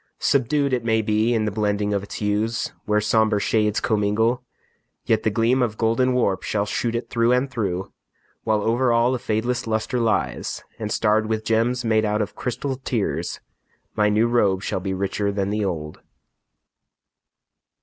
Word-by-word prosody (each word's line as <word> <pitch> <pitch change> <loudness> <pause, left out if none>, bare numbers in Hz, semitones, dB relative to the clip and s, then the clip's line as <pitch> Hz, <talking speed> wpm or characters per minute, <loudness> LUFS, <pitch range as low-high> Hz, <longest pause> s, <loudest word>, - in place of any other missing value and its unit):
Subdued, 140 +1 +1
It 125 -2 0
may 110 -1 +1
be, 110 +2 +1
in 110 -2 +1
the 105 - -1
blending 105 0 0
of 100 - 0
its 100 - -8
hues, 105 +2 -1
Where 105 0 +2
somber 105 0 +2
shades 105 0 +1
commingle, 110 +3 +1 0.6
yet 110 -1 +2
the - - +1
gleam 115 +4 +2
Of 110 -3 -1
golden 115 +3 +2
warp 110 -6 +1
shall 105 -1 -1
shoot 115 +3 -2
it 115 -1 -4
through 115 0 +2
and 130 +2 +1
through, 95 -6 -3 0.5
While 105 -1 +1
over 120 +3 +2
all 120 +2 +3
a 130 - -1
fadeless 120 +1 -1
luster 110 +3 -1
lies, 115 -2 -1 0.2
And 105 -1 -4
starred 110 0 +2
with 110 0 -2
gems 115 +2 +1
made 110 -1 +2
out 105 0 0
of 100 - -8
crystalled 130 +1 -4
tears, 115 -5 -2 0.5
My 105 -1 +3
new 105 +2 +3
robe 100 -5 +2
shall - - -2
be 95 0 -3
richer 100 +1 -1
than 100 0 -1
the 105 0 -1
old. 80 -5 -4
110 Hz, 170 wpm, -23 LUFS, 105-120 Hz, 0.6 s, all